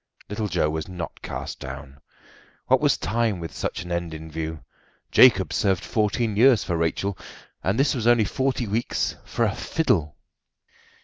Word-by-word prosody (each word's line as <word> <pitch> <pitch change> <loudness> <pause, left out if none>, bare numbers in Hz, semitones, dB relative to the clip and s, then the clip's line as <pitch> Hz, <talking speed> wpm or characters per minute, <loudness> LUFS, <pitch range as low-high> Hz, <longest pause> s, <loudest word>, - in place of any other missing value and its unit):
Little 105 +1 -2
Joe 85 -4 +1
was 80 +3 -3
not 90 -3 -7
cast - - -6
down. 65 +1 -8 0.7
What - - +3
was - - +3
time 110 -2 0
with 85 -1 -6
such - - -3
an 90 - -8
end 85 -2 -2
in 80 0 -9
view? 80 0 -4 0.5
Jacob - - +6
served 95 -1 +1
fourteen 110 0 0
years 120 -3 +5
for 85 0 -2
Rachel, 85 +4 -1 0.5
and 95 +4 +1
this 140 - +3
was 120 -4 -1
only 120 -3 +5
forty 130 +3 -1
weeks 110 +3 -1
for - - -2
a - - 0
fiddle! 80 - 0
95 Hz, 165 wpm, -24 LUFS, 80-110 Hz, 0.7 s, Jacob